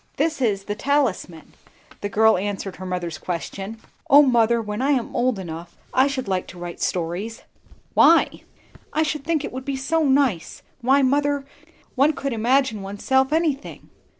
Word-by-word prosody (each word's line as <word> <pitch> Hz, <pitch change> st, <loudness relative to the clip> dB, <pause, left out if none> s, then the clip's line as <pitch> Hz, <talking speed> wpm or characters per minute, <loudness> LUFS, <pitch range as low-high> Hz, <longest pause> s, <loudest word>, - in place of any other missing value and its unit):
"This 310 Hz, 0 st, 0 dB
is 205 Hz, -5 st, +1 dB
the 205 Hz, -, -3 dB
'Talisman,'" 215 Hz, -, -1 dB, 0.5 s
the 205 Hz, -, -3 dB
girl 220 Hz, +2 st, +4 dB
answered 195 Hz, 0 st, -4 dB
her 185 Hz, -, -7 dB
mother's 175 Hz, -3 st, -4 dB
question. 195 Hz, +5 st, -5 dB, 0.3 s
"O 285 Hz, +2 st, +8 dB
mother, 235 Hz, -3 st, +3 dB
when 210 Hz, 0 st, -4 dB
I 280 Hz, +2 st, +3 dB
am 250 Hz, -4 st, -2 dB
old 250 Hz, -2 st, +1 dB
enough, 170 Hz, -2 st, -8 dB, 0.2 s
I 260 Hz, +2 st, +4 dB
should 265 Hz, -4 st, -3 dB
like 185 Hz, -2 st, -1 dB
to 180 Hz, -, -11 dB
write 175 Hz, -1 st, -7 dB
stories!" 180 Hz, +6 st, -3 dB, 0.5 s
"Why?" -, -, +4 dB, 0.5 s
"I 315 Hz, -, +1 dB
should 305 Hz, -2 st, -3 dB
think 315 Hz, -2 st, 0 dB
it -, -, -6 dB
would 260 Hz, +1 st, -6 dB
be 275 Hz, 0 st, -3 dB
so 320 Hz, +5 st, 0 dB
nice. 270 Hz, -, +1 dB, 0.2 s
Why, 270 Hz, +3 st, +4 dB
mother, 285 Hz, +1 st, +1 dB, 0.5 s
one 280 Hz, +4 st, +3 dB
could 275 Hz, -2 st, -3 dB
imagine 230 Hz, -1 st, +1 dB
oneself 265 Hz, +8 st, 0 dB
anything." 310 Hz, -3 st, -2 dB
240 Hz, 165 wpm, -23 LUFS, 195-275 Hz, 0.5 s, O